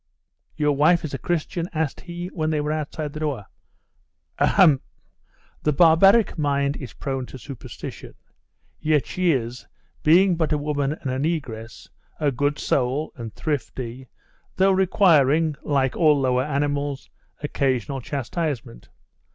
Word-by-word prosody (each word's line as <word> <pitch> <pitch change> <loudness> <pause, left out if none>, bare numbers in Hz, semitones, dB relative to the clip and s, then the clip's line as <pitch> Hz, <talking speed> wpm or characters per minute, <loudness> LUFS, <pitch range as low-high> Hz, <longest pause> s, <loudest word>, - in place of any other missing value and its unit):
'Your 150 -1 +2
wife 155 +4 +3
is 145 - -6
a 135 - -3
Christian?' 170 +2 -2
asked 155 -3 -2
he 175 0 -6
when 155 -4 -2
they 155 -1 0
were 150 +1 -1
outside 155 -1 -4
the 155 - -6
door. 145 -9 -2 0.9
'Ahem! 155 -9 +5 0.8
The 150 - +1
barbaric 175 +7 +5
mind 140 -1 +1
is 130 -5 -8
prone 135 -3 -4
to - - -9
superstition. 130 -2 -9 0.6
Yet 155 -2 +2
she 185 -2 +1
is, 125 -2 -3 0.3
being 175 +3 +5
but 160 -2 0
a 150 - +2
woman 145 -1 -1
and 140 -4 -5
a 130 - -2
negress, 135 -8 -4 0.3
a 150 -2 +2
good 145 +3 0
soul, 135 +4 0
and 115 -3 -7
thrifty, 130 -3 -4 0.5
though 195 +1 +4
requiring, 165 -5 +3
like 135 -3 0
all 155 -4 +4
lower 130 -1 +1
animals, 145 -1 -2 0.3
occasional 135 -2 -1
chastisement. 140 - -4
145 Hz, 135 wpm, -23 LUFS, 135-160 Hz, 0.9 s, Ahem